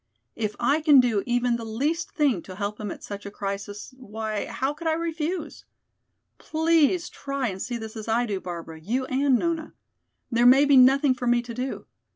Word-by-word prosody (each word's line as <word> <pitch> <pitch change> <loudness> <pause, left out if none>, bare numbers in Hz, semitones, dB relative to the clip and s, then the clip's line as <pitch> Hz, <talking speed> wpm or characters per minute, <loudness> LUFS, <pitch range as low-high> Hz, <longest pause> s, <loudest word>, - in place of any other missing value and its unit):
If 215 -2 -3
I 280 +6 +2
can 295 -3 +7
do 235 -5 +2
even 245 0 +1
the 230 - -7
least 285 +10 -2
thing 280 - +1
to 185 - -10
help 205 +1 -4
him 210 -1 -4
at - - -8
such 200 0 -7
a - - -5
crisis, 200 +3 -6
why, 220 -4 -4
how 270 +2 -2
could 330 +2 -6
I 320 - +3
refuse? 330 +1 -3 0.8
Please 330 +2 +2
try 275 -3 -3
and 190 -1 -6
see 245 -1 -3
this 220 -1 -8
as 220 0 -7
I 230 +2 +2
do, 200 -4 -3
Barbara, 170 -3 -7
you 245 +10 -1
and 265 0 +2
Nona. 330 +2 -2 0.6
There 240 +1 +4
may 270 +3 +7
be 285 -1 +5
nothing 265 +2 +6
for 250 -1 -4
me 240 0 +3
to 240 -1 -7
do. 255 +3 -4
245 Hz, 195 wpm, -25 LUFS, 215-285 Hz, 0.8 s, can